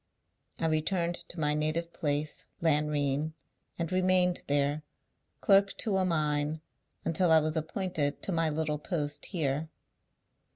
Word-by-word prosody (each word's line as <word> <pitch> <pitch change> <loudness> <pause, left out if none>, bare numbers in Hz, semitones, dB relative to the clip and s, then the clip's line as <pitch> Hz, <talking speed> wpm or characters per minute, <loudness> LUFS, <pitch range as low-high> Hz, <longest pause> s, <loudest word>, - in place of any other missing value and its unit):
I - - 0
returned 170 +2 +1 0.2
to 175 - -7
my 150 -1 +2
native 155 +3 -1
place, 145 0 -1
Lanrean, 150 -1 +1 0.4
and 170 0 -3
remained 185 -1 +3
there, 145 +1 +1 0.6
clerk 200 0 +4
to 210 -4 0
a 190 - +2
mine, 150 -2 0 0.5
until 170 +2 +2
I 160 - +8
was 155 +1 -1
appointed 160 -2 -1
to - - -1
my 165 -2 +2
little 150 -1 -1
post 150 -3 -2
here." 155 -3 -1
155 Hz, 130 wpm, -30 LUFS, 150-175 Hz, 0.6 s, I